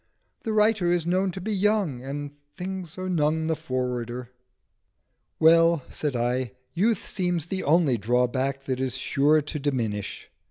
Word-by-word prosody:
The 220 - -3
writer 215 -4 +3
is 175 -2 +1
known 185 +2 +1
to 190 - -6
be 210 +4 -2
young, 200 - +1
and 140 +2 -5 0.3
things 185 -2 -5
are 185 0 -4
none 160 -2 +1
the 160 0 +1
forwarder." 125 -2 -3 1.1
"Well," 165 -1 +5
said 145 -4 -2
I, 125 +1 0 0.2
"youth 210 +4 +1
seems 180 -5 -1
the 190 +1 -3
only 150 -6 +3
drawback 125 +5 +1
that 130 -2 -2
is 130 -1 -1
sure 150 +3 +3
to 150 +1 -5
diminish. 115 -8 -3
150 Hz, 150 wpm, -26 LUFS, 130-180 Hz, 1.1 s, Well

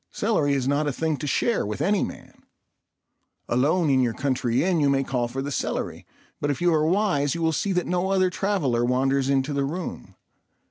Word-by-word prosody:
Celery 160 -10 0
is 135 -2 0
not 145 +2 +1
a - - +1
thing 160 +3 -1
to 150 - -5
share 230 - +1
with 105 0 -4
any 205 +1 +2
man. - - -9 1.1
Alone 150 +8 +2
in 130 - +3
your 120 -3 0
country 130 -3 0
inn 180 -2 +1
you 145 -2 +3
may 135 0 +2
call 125 -3 -1
for 135 +3 -4
the 145 - -4
celery; - - -3 0.3
but 145 - -1
if 140 - -1
you 175 -1 +3
are 155 0 +2
wise 170 -7 +1
you 170 - -4
will 160 - +3
see 200 +6 -1
that 180 -1 0
no 180 +1 -1
other 185 -1 +2
traveller 170 -13 0
wanders 135 +2 +1
into 140 +1 +1
the 140 0 0
room. 165 +5 -5
145 Hz, 205 wpm, -24 LUFS, 135-180 Hz, 1.1 s, in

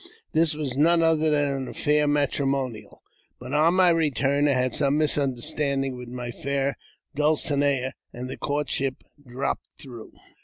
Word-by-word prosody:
This 160 -1 +3
was 145 -4 -3
none 165 +4 +4
other 160 -1 +2
than 145 -2 +1
an 130 -1 -5
affair 150 -1 +1
matrimonial; 140 -5 -1 0.4
but 125 +2 -8
on 160 +4 +3
my 185 -1 +5
return 145 -3 +1
I 140 - +3
had 125 -1 0
some 140 0 +1
misunderstanding 140 -1 +1
with 125 -1 -9
my 120 -1 -6
fair 140 +2 -2 0.4
dulcinea, 145 -3 +1 0.2
and 125 +1 -7
the 130 - -6
courtship 140 -2 -2 0.3
dropped 125 +3 -3
through. 120 -5 -11
140 Hz, 145 wpm, -25 LUFS, 130-150 Hz, 0.4 s, my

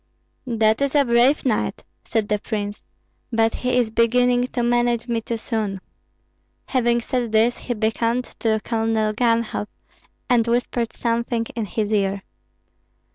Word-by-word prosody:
"That 220 0 +2
is 280 +1 0
a 285 -1 +5
brave 240 +5 +3
knight," 230 -5 -1 0.2
said 220 -2 -1
the 210 0 0
prince, 205 -1 -5 0.4
"but 225 -1 +2
he 250 0 0
is 235 -3 +1
beginning 245 +2 +3
to 245 -1 -2
manage 240 0 +1
me 230 -1 -1
too 230 +1 -3
soon." 215 -3 -3 0.9
Having 240 -2 +1
said 240 -1 -2
this, 225 +2 +3
he 245 - -3
beckoned 230 +3 0 0.2
to 220 -1 +1
Colonel 225 -2 0
Ganhoff 230 -2 0 0.6
and 240 -2 +3
whispered 235 -1 0
something 235 0 -1
in 230 -2 -2
his 215 +1 -2
ear. 200 -1 0
230 Hz, 140 wpm, -22 LUFS, 220-240 Hz, 0.9 s, a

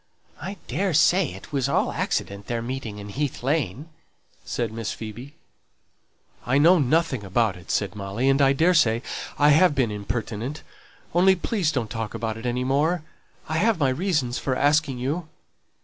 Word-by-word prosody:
"I 190 +5 -5
daresay 175 +3 +3
it 100 +11 -12
was 135 -3 0
all - - +1
accident 100 0 -2
their 115 -1 -2
meeting 120 -4 -5
in 105 0 -8
Heath 140 +3 -3
Lane," 140 - -1 0.6
said 115 -3 -3
Miss 115 -2 -3
Phoebe. 115 +6 -8 1.1
"I 130 +3 +1
know 170 +5 +6
nothing 145 -3 +1
about 100 +1 +1
it," 90 -1 -14
said 100 -2 0
Molly, 100 +5 -2
"and 135 +1 +4
I 135 -1 +5
daresay 140 -6 +3 0.3
I 145 0 +5
have 155 +1 +5
been 125 -5 +1
impertinent, 110 +5 -4 0.5
only 190 +3 +5
please 180 -2 0
don't 120 -7 -2
talk 110 -3 -4
about 110 -1 -3
it 115 +2 -5
any 125 +1 -1
more. 150 +6 +1 0.4
I 160 - -1
have 220 +4 +3
my 140 -4 +2
reasons 145 -5 0
for 130 - -1
asking 145 -1 +2
you." 150 +7 -2
135 Hz, 165 wpm, -24 LUFS, 115-155 Hz, 1.1 s, know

